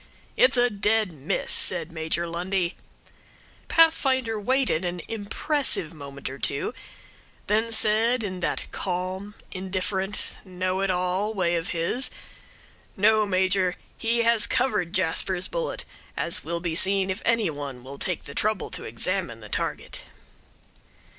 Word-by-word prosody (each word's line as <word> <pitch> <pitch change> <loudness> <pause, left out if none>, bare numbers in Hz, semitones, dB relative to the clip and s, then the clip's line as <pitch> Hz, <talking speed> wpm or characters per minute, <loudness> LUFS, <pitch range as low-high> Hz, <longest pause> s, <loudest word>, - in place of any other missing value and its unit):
"It's - - +5
a 245 0 +4
dead 210 0 +2
miss," 145 0 -2
said 170 -2 +2
Major 160 +1 -1
Lundie. 175 +1 -1 0.9
Pathfinder 260 -8 +4
waited 250 -6 +2
an 175 0 -2
impressive 225 - -1
moment 140 -2 -7
or 135 +1 -6
two; 140 - -1 0.7
then 220 +3 +1
said, 225 +2 +3
in 185 -3 -3
that 170 - -1
calm, 185 +2 -3 0.2
indifferent, 190 +1 -3
know 185 0 -2
it 195 - +1
all 185 +4 0
way 175 -3 +2
of 165 0 -2
his, 170 +10 0 0.9
"No, 215 +1 +4
Major, 185 -1 +2 0.2
he 235 +1 +1
has 230 -1 +4
covered 245 -9 +1
Jasper's 185 0 +1
bullet, - - -3 0.3
as 170 - +1
will 170 +2 -2
be 170 -2 -1
seen 190 +2 +2
if 190 - -4
any 230 -6 +2
one 140 -4 -6
will 140 +2 -9
take 185 -4 -2
the 140 - -9
trouble 215 +2 0
to - - -3
examine 170 - -1
the 105 -1 -11
target." - - -3
190 Hz, 135 wpm, -26 LUFS, 170-220 Hz, 0.9 s, It's